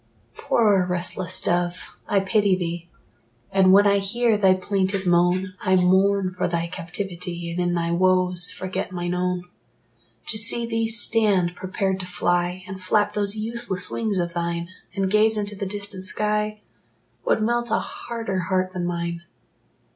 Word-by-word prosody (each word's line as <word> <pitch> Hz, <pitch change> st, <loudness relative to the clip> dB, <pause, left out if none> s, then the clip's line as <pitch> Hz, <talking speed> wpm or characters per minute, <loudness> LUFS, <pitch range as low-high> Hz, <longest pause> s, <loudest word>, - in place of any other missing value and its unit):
Poor 205 Hz, -, +2 dB
restless 180 Hz, +1 st, 0 dB
dove, 175 Hz, 0 st, -1 dB
I 200 Hz, -, +2 dB
pity 200 Hz, 0 st, +2 dB
thee; 175 Hz, -1 st, -4 dB, 0.6 s
And 190 Hz, -1 st, +5 dB
when 200 Hz, +2 st, +7 dB
I 200 Hz, 0 st, +4 dB
hear 225 Hz, +3 st, +1 dB
thy 190 Hz, -2 st, +4 dB
plaintive 190 Hz, 0 st, -1 dB
moan, 180 Hz, +2 st, +2 dB
I 185 Hz, -, +2 dB
mourn 190 Hz, +1 st, +3 dB
for 180 Hz, -, -1 dB
thy 170 Hz, -1 st, -1 dB
captivity, 175 Hz, 0 st, -5 dB
And 170 Hz, -, -4 dB
in 175 Hz, 0 st, +1 dB
thy 170 Hz, 0 st, -1 dB
woes 180 Hz, 0 st, +2 dB
forget 185 Hz, +1 st, -4 dB
mine 175 Hz, -1 st, -3 dB
own. 180 Hz, 0 st, -1 dB, 0.9 s
To 215 Hz, -, 0 dB
see 235 Hz, +3 st, +3 dB
thee 225 Hz, -1 st, -1 dB
stand 205 Hz, -5 st, +2 dB
prepared 190 Hz, +1 st, -2 dB
to 185 Hz, -, -6 dB
fly, 175 Hz, 0 st, -1 dB
And 190 Hz, 0 st, -7 dB
flap 205 Hz, +3 st, +1 dB
those 205 Hz, 0 st, 0 dB
useless 220 Hz, -4 st, -2 dB
wings 215 Hz, -4 st, -1 dB
of 175 Hz, -1 st, -1 dB
thine, 170 Hz, 0 st, -2 dB, 0.3 s
And 195 Hz, -1 st, 0 dB
gaze 215 Hz, +1 st, +4 dB
into 205 Hz, 0 st, -3 dB
the 200 Hz, 0 st, -4 dB
distant 200 Hz, -1 st, -5 dB
sky, 210 Hz, +2 st, -1 dB, 0.6 s
Would 215 Hz, -, +1 dB
melt 240 Hz, +1 st, 0 dB
a 225 Hz, -, +2 dB
harder 225 Hz, -5 st, -4 dB
heart 185 Hz, +1 st, -1 dB
than 175 Hz, -2 st, -2 dB
mine. 170 Hz, -1 st, -3 dB
185 Hz, 155 wpm, -23 LUFS, 180-205 Hz, 0.9 s, when